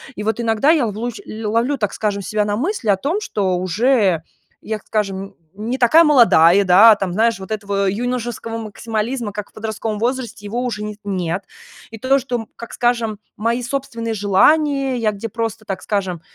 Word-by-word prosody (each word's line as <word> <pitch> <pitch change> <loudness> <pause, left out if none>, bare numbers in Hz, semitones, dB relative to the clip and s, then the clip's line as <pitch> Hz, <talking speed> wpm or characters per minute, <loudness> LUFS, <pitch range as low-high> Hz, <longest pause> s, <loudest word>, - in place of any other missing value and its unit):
И 210 - -5
вот 220 +2 -1
иногда 225 +4 +2
я 295 -7 +3
лувлущ 220 +2 -4
ль 220 +1 -8
ловлю, 235 +6 +1
так 210 -4 -2
скажем, 205 -2 -2
себя 210 +3 0
на 205 - -1
мысли 320 - -2
о 200 - +5
том, 300 - -1
что 195 - -1
уже, 190 -1 +2 0.4
я, 220 0 -3
как - - -27
скажем, 195 -2 -2 0.2
не 230 +5 -3
такая 305 +7 +6
молодая, 200 - +6
да. 205 +5 +8
Там, 190 -3 -3
знаешь, 225 +1 +2
вот 190 +2 -9
этого 200 -2 -1
юношеского 235 +1 -3
максимализма, 225 +1 -3
как 205 0 -6
в - - -50
подростковом 215 -1 -4
возрасте, 240 -3 -3
его 235 +4 -3
уже 215 -4 -3
не 210 0 -5
с - - -33
нет. 185 -2 -2 0.5
И 225 - -8
то, 265 +4 +2
что, 250 -1 -4
м, 225 -2 -7
как 235 - -9
скажем, 235 -3 0 0.2
мои 235 +3 -1
собственные 235 -3 -3
желания, 270 +7 +3
я 225 -3 +1
где 210 +2 -6
просто, 225 0 -4
так 195 -3 -4
скажем, 190 -5 -2
220 Hz, 190 wpm, -19 LUFS, 200-240 Hz, 0.5 s, да